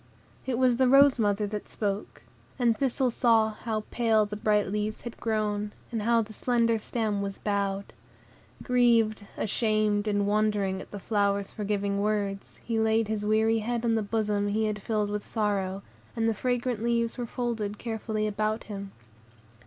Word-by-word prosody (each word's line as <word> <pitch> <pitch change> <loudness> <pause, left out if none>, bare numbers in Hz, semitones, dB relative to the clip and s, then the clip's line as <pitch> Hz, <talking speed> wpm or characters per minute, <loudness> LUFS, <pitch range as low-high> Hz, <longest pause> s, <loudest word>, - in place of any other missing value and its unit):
It 250 -3 0
was 250 -2 +3
the 260 0 +4
rose 275 0 +6
mother 205 -1 +1
that 210 0 -5
spoke, 205 -1 -4 0.3
and 240 -3 +3
Thistle 260 +1 0
saw 225 -2 +3
how 215 0 -3
pale 225 -3 +3
the 210 0 -6
bright 210 -2 +1
leaves 210 +1 -2
had 235 - -8
grown, 210 -2 -1 0.2
and 225 -2 -2
how 230 +1 +3
the 215 +1 -11
slender 230 0 +1
stem 215 -2 -1
was 200 -1 -4
bowed. 200 -1 -2 0.7
Grieved, 230 -4 +3
ashamed, 215 -1 +1
and 205 -1 +1
wondering 205 -2 +1
at - - -11
the 205 - -7
flower's 200 -1 0
forgiving 200 -1 -1
words, 200 -2 -2
he 230 -1 0
laid 220 0 +2
his 210 -1 -2
weary 220 +1 +3
head 235 +2 -2
on 230 - +2
the 225 - +2
bosom 210 -1 0
he 215 +2 +1
had 210 -1 -2
filled 210 -1 -1
with 210 0 -4
sorrow, 200 -3 -1 0.3
and 225 -1 +1
the 225 - +2
fragrant 245 0 -1
leaves 235 +1 0
were 240 - -2
folded 225 -4 -3
carefully 220 -2 -3
about 215 +1 -1
him. 200 -2 -7
215 Hz, 170 wpm, -28 LUFS, 205-230 Hz, 0.7 s, rose